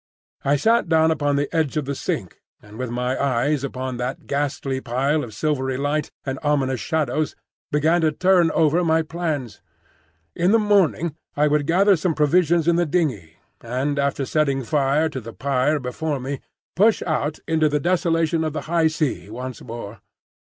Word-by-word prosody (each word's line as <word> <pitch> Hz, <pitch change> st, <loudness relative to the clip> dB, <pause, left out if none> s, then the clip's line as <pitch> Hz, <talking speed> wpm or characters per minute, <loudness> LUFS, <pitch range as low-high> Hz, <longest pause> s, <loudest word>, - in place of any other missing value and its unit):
I 140 Hz, +1 st, +3 dB
sat 225 Hz, -, +2 dB
down 160 Hz, -1 st, +4 dB
upon 145 Hz, -2 st, 0 dB
the 145 Hz, 0 st, 0 dB
edge 160 Hz, -2 st, 0 dB
of 150 Hz, -, -1 dB
the 140 Hz, -, -2 dB
sink, -, -, -4 dB, 0.2 s
and 105 Hz, +2 st, -14 dB
with 130 Hz, -1 st, -3 dB
my 125 Hz, +2 st, -2 dB
eyes 140 Hz, +2 st, +1 dB
upon 130 Hz, -2 st, -4 dB
that 125 Hz, +2 st, -4 dB
ghastly 140 Hz, -2 st, -2 dB
pile 135 Hz, +6 st, 0 dB
of 115 Hz, -, -7 dB
silvery 130 Hz, -3 st, -1 dB
light 145 Hz, +2 st, -1 dB, 0.2 s
and 135 Hz, -1 st, -3 dB
ominous 135 Hz, -4 st, 0 dB
shadows 155 Hz, +4 st, -1 dB, 0.4 s
began 160 Hz, +4 st, +2 dB
to 160 Hz, -1 st, +3 dB
turn 180 Hz, +1 st, +3 dB
over 165 Hz, +2 st, +3 dB
my 160 Hz, -1 st, +2 dB
plans. 155 Hz, -7 st, -4 dB, 0.7 s
In 180 Hz, +4 st, +2 dB
the -, -, +7 dB
morning 190 Hz, -7 st, +2 dB, 0.2 s
I 150 Hz, +1 st, +4 dB
would 150 Hz, -1 st, +1 dB
gather 195 Hz, +4 st, +4 dB
some 165 Hz, -1 st, -1 dB
provisions 165 Hz, +2 st, +3 dB
in 170 Hz, 0 st, +4 dB
the 175 Hz, -1 st, +1 dB
dingey, 130 Hz, -, -1 dB, 0.3 s
and 130 Hz, +5 st, -2 dB
after 140 Hz, -1 st, 0 dB
setting 140 Hz, -2 st, 0 dB
fire 145 Hz, +3 st, +1 dB
to 135 Hz, -5 st, -5 dB
the 115 Hz, +1 st, -9 dB
pyre 140 Hz, +2 st, +1 dB
before 140 Hz, +3 st, -3 dB
me, 135 Hz, +1 st, -4 dB, 0.4 s
push 215 Hz, +5 st, +3 dB
out 155 Hz, -2 st, -1 dB
into 160 Hz, -1 st, +2 dB
the 150 Hz, 0 st, 0 dB
desolation 165 Hz, -1 st, +1 dB
of 155 Hz, -2 st, -2 dB
the -, -, -3 dB
high 165 Hz, 0 st, +2 dB
sea 155 Hz, -9 st, -2 dB
once 125 Hz, +3 st, -7 dB
more. 115 Hz, -3 st, -8 dB
150 Hz, 175 wpm, -22 LUFS, 130-160 Hz, 0.7 s, the